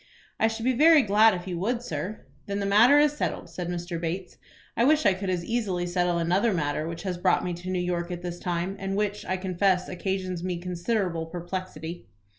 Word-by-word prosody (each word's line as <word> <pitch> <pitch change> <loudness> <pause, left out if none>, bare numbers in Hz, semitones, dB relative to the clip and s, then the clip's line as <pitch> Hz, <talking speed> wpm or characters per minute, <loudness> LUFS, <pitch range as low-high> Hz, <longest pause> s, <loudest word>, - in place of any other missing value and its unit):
"I 220 - +4
should 225 +1 -4
be 260 - +3
very 305 +3 +6
glad 215 0 +5
if 175 0 -6
you 180 -2 -4
would, 235 +5 -1
sir." 215 -4 -4 0.3
"Then 200 0 -2
that 200 - -1
matter 225 +8 +6
is 295 0 +5
settled," 290 - -3
said 175 +1 -5
Mr. 175 -1 -4
Bates. 175 +2 -4 0.4
"I 230 - +2
wish 305 +4 +4
I 195 - +6
could 190 +1 -4
as 175 -2 -1
easily 195 -6 -1
settle 175 0 0
another 185 +6 +2
matter 150 -1 -1
which 165 0 -6
has 180 -3 -3
brought - - +2
me 180 - -2
to 175 +2 -7
New 185 - -1
York 175 -1 -1
at 175 -1 -5
this 175 -1 -5
time, 175 +2 -2
and 195 0 -3
which, 210 0 -1
I 185 - 0
confess, 185 0 +1
occasions 185 -1 -3
me 180 -1 -2
considerable 180 -1 -2
perplexity." 175 -1 -6
185 Hz, 215 wpm, -26 LUFS, 175-205 Hz, 0.4 s, very